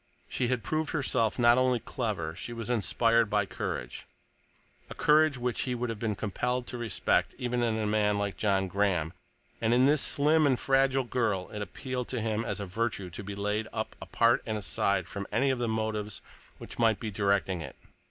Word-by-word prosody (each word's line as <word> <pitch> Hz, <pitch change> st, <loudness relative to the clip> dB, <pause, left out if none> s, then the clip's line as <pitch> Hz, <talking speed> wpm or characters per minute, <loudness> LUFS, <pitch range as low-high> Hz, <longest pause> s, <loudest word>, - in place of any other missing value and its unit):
She 125 Hz, -, -1 dB
had 125 Hz, -2 st, -1 dB
proved 155 Hz, -1 st, -1 dB
herself 130 Hz, -7 st, +1 dB
not 120 Hz, 0 st, +5 dB
only 130 Hz, -1 st, +2 dB
clever; 100 Hz, -11 st, -3 dB
she 120 Hz, -, -6 dB
was 115 Hz, 0 st, -4 dB
inspired 115 Hz, +2 st, +3 dB
by 105 Hz, -1 st, +2 dB
courage—a 60 Hz, -8 st, -9 dB
courage 155 Hz, -2 st, +4 dB
which 125 Hz, -1 st, -1 dB
he 125 Hz, -1 st, -1 dB
would 120 Hz, -1 st, -2 dB
have 110 Hz, -, -6 dB
been 110 Hz, -2 st, -1 dB
compelled 125 Hz, +5 st, -2 dB
to 125 Hz, -, -5 dB
respect 115 Hz, -5 st, 0 dB
even 125 Hz, 0 st, -1 dB
in 115 Hz, -2 st, +1 dB
a 110 Hz, -, -1 dB
man 105 Hz, -1 st, +2 dB
like 100 Hz, -1 st, -2 dB
John 95 Hz, -2 st, +1 dB
Graham, 90 Hz, -4 st, 0 dB, 0.5 s
and 115 Hz, +1 st, +3 dB
in 125 Hz, +1 st, +5 dB
this 145 Hz, 0 st, +4 dB
slim 150 Hz, +1 st, +3 dB
and 130 Hz, -3 st, +2 dB
fragile 135 Hz, 0 st, +2 dB
girl 115 Hz, -7 st, -1 dB
it 105 Hz, -, -5 dB
appealed 125 Hz, +4 st, -4 dB
to 125 Hz, -, -3 dB
him 110 Hz, 0 st, -1 dB
as -, -, -3 dB
a 100 Hz, -, -3 dB
virtue 100 Hz, -1 st, -2 dB
to 95 Hz, -, -7 dB
be 100 Hz, 0 st, -6 dB
laid 105 Hz, +2 st, -1 dB
up 110 Hz, -, -4 dB
apart 115 Hz, 0 st, +2 dB
and 110 Hz, -1 st, -1 dB
aside 100 Hz, -2 st, 0 dB
from 100 Hz, 0 st, -6 dB
any 135 Hz, 0 st, +2 dB
of 130 Hz, -, -2 dB
the 120 Hz, -, 0 dB
motives 110 Hz, -1 st, -2 dB, 0.3 s
which -, -, -10 dB
might 115 Hz, -3 st, +3 dB
be 110 Hz, -, -4 dB
directing 100 Hz, -3 st, 0 dB
it. -, -, -8 dB
115 Hz, 195 wpm, -29 LUFS, 100-125 Hz, 0.5 s, not